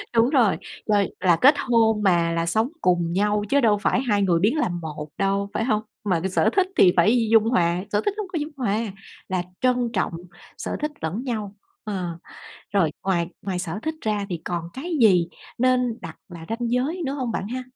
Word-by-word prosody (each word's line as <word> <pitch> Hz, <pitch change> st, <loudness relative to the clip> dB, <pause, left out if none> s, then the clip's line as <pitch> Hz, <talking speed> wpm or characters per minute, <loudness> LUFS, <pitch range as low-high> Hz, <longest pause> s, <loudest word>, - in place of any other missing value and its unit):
Đúng 230 Hz, +3 st, +4 dB
rồi, 245 Hz, -9 st, +3 dB, 0.3 s
rồi 205 Hz, -2 st, +2 dB
là 180 Hz, -3 st, +4 dB
kết 285 Hz, +3 st, +7 dB
hôn 225 Hz, -5 st, +2 dB
mà 170 Hz, -3 st, +3 dB
là 165 Hz, 0 st, 0 dB
sống 220 Hz, +9 st, +1 dB
cùng 175 Hz, -2 st, +1 dB
nhau 205 Hz, +2 st, +1 dB
chứ 280 Hz, -, +4 dB
đâu 210 Hz, -3 st, +4 dB
phải 240 Hz, +4 st, +1 dB
2 210 Hz, -6 st, +1 dB
người 175 Hz, -4 st, +3 dB
biến 225 Hz, -, +2 dB
làm 175 Hz, -, -1 dB
1 150 Hz, -1 st, -6 dB
đâu, 195 Hz, 0 st, 0 dB
phải 225 Hz, -, 0 dB
hông? 215 Hz, -4 st, +1 dB, 0.2 s
Mà 180 Hz, -5 st, +1 dB
cái 190 Hz, +3 st, -2 dB
sở -, -, +2 dB
thích 380 Hz, -1 st, +3 dB
thì 180 Hz, -2 st, +6 dB
phải 225 Hz, +6 st, +4 dB
dung 225 Hz, -1 st, +6 dB
hòa. 180 Hz, -6 st, +1 dB
Sở 205 Hz, 0 st, +2 dB
thích 410 Hz, -, +1 dB
nó -, -, -1 dB
hông -, -, -9 dB
có -, -, 0 dB
dung 300 Hz, +1 st, -4 dB
hòa, 220 Hz, -3 st, 0 dB, 0.5 s
là 185 Hz, -1 st, 0 dB, 0.2 s
trân 250 Hz, -2 st, +2 dB
trọng 185 Hz, -3 st, 0 dB, 0.4 s
sở -, -, -4 dB
thích 300 Hz, 0 st, -1 dB
lẫn 180 Hz, +10 st, -3 dB
nhau, 215 Hz, -5 st, -4 dB, 0.3 s
ờ. 180 Hz, -5 st, -4 dB, 0.6 s
Rồi 170 Hz, -6 st, +3 dB
ngoài 175 Hz, -3 st, +1 dB
ngoài 185 Hz, -2 st, -3 dB
sở 180 Hz, +2 st, -4 dB
thích 315 Hz, 0 st, -2 dB
ra 210 Hz, -2 st, -1 dB
thì 170 Hz, -3 st, -4 dB
còn 170 Hz, -1 st, -3 dB
cái 330 Hz, +7 st, -6 dB
gì 180 Hz, -6 st, +5 dB, 0.3 s
nên 250 Hz, -2 st, +2 dB
đặt 165 Hz, -2 st, -8 dB
là 165 Hz, -2 st, -9 dB
ranh 235 Hz, +1 st, -2 dB
giới 290 Hz, +9 st, 0 dB
nữa 270 Hz, -, -2 dB
hông 255 Hz, -5 st, -2 dB
bạn 200 Hz, -, -3 dB
ha? 255 Hz, +2 st, -4 dB
210 Hz, 215 wpm, -23 LUFS, 180-245 Hz, 0.6 s, kết